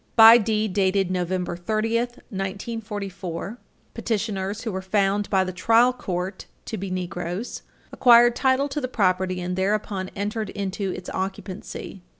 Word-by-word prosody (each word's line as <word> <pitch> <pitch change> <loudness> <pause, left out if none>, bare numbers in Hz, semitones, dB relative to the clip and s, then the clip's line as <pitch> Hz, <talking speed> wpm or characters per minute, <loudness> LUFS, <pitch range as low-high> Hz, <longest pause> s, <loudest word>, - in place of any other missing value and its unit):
By 225 +1 +10
deed 215 -2 0
dated 190 -1 +2
November 180 -1 -1
30, 215 +6 0 0.4
1944, 195 -1 -5 0.3
petitioners, 205 -2 -2
who 225 - -3
were 190 0 -3
found 200 +1 +1
by 190 -2 +3
the 185 0 -4
trial 230 +7 +4
court 185 -5 -4 0.2
to 225 - -4
be 195 +1 -4
Negroes, 180 +3 -4 0.3
acquired 240 -1 +6
title 265 +2 +2
to 295 +2 -3
the 255 - -1
property, 185 -5 +1
and 180 0 -3
thereupon 195 0 -1
entered 210 +2 -3
into 195 -1 -3
its 180 0 -6
occupancy. 190 0 -5
195 Hz, 140 wpm, -24 LUFS, 185-225 Hz, 0.4 s, By